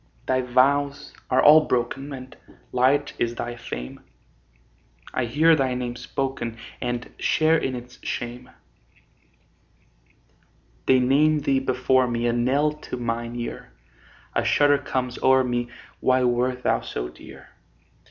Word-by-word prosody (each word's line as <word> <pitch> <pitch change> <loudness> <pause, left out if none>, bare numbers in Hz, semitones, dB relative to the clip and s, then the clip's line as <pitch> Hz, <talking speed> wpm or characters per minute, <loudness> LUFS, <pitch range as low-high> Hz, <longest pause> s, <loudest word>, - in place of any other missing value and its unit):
Thy 130 0 +1
vows 140 +3 +1 0.2
are 130 - +3
all 155 +1 +8
broken, 125 +3 -1
And 130 -1 -9 0.4
light 135 +3 +2
is 120 0 0
thy 120 0 -4
fame; 60 - -7 1.1
I 130 - 0
hear 155 +7 +4
thy 130 -3 0
name 125 -1 -3
spoken, 125 -1 -4 0.2
And 120 -1 -4
share 160 +1 +3
in 130 -5 -1
its 125 0 -10
shame. 120 +1 -5 2.4
They 130 -1 +5
name 145 +4 +3
thee 135 -1 +2
before 130 0 +2
me, 120 0 -2
A 120 - +2
knell 135 +5 +2 0.2
to - - -3
mine 120 0 -3
ear; 120 0 -6 0.6
A - - +1
shudder 145 -1 +4
comes 125 -2 -3
o'er 130 0 +5
me 120 -1 -1 0.3
Why 130 0 +2
wert 125 +1 0
thou - - +1
so - - -5
dear? - - -14
125 Hz, 135 wpm, -24 LUFS, 120-135 Hz, 2.4 s, all